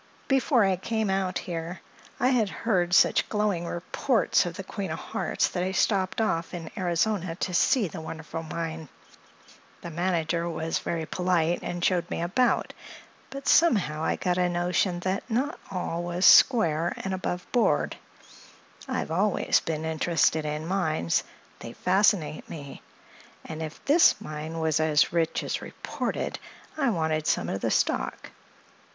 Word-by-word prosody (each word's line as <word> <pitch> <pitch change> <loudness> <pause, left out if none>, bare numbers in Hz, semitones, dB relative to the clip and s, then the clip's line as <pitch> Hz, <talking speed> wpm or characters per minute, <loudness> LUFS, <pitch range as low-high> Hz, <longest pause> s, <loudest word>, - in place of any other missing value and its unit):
Before 270 -3 +3
I 190 -1 +1
came 220 +1 -1
out 190 -1 0
here 170 +1 -5 0.4
I 250 - +3
had 235 -6 +2
heard 180 -7 0
such - - +4
glowing 205 -5 0
reports 170 +1 +1
of - - -6
the - - -6
Queen - - -5
of - - -3
Hearts - - -1
that 180 - -3
I 185 +1 -1
stopped 190 0 +1
off 170 -6 -1
in 165 -2 -7
Arizona 180 0 0
to 180 +1 -3
see 215 +5 +3
the 160 - -7
wonderful 160 0 -6
mine. 160 -1 -5 0.9
The 170 - -7
manager 170 0 -1
was 160 0 -2
very 165 -2 -3
polite 175 -1 0
and 175 0 -3
showed 180 -2 +1
me - - -3
about, 190 +9 +1 0.6
but 275 0 -7
somehow 195 - +3
I - - +1
got 180 0 -1
a 180 0 +2
notion 175 +1 0
that 190 +2 -1 0.5
all 180 -3 -3
was 175 0 -4
not 180 - -1
square 170 - +6
and 195 - -4
aboveboard. 185 +5 0 0.9
I've 255 -10 -3
always 195 +4 +2
been 160 -1 -4
interested 160 -1 +1
in 150 +1 -3
mines; 160 - 0 0.4
they 115 - -8
fascinate 185 -4 +1
me; 140 -4 -8 0.6
and 160 0 -6
if 155 -1 -7
this 310 -3 +5
mine 155 -4 -6
was 160 -1 +1
as 155 0 +3
rich 165 -2 0
as - - -3
reported - - -4 0.4
I 280 -5 +1
wanted 160 -5 -1
some - - +1
of 95 - -3
the - - 0
stock. - - -1
175 Hz, 150 wpm, -27 LUFS, 160-195 Hz, 0.9 s, square